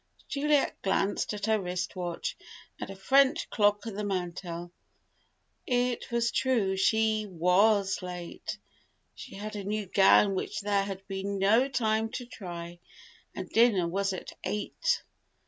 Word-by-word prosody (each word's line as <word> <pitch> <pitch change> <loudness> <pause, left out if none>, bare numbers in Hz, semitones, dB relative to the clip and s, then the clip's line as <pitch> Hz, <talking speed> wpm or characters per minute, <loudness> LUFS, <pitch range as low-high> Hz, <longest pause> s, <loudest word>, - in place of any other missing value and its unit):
Juliet 295 0 +1
glanced 195 +1 0
at 205 -1 -3
her 220 -1 +2
wrist 180 -1 -3
watch 180 - -3 0.4
and - - -5
a 195 - -7
French 275 - +3
clock 205 0 +2
on 225 - -5
the 210 +2 -4
mantel. 175 -3 -4 1.0
It 245 -1 0
was 235 -1 +1
true, 225 -8 +1
she 215 +2 +2
was 195 +4 +3
late! 180 -1 -6 0.6
She - - -10
had 210 +2 -6
a 205 - -4
new 210 +1 -2
gown 195 +1 +5
which 190 - -3
there 200 -1 +1
had 195 -1 -7
been 195 0 -3
no 220 +7 +4
time 220 -4 +1
to 250 - -4
try, 175 -6 -8 0.6
and 185 - -5
dinner 220 -7 +4
was 195 +3 0
at 185 - -6
eight. 210 - -1
200 Hz, 145 wpm, -29 LUFS, 190-220 Hz, 1.0 s, gown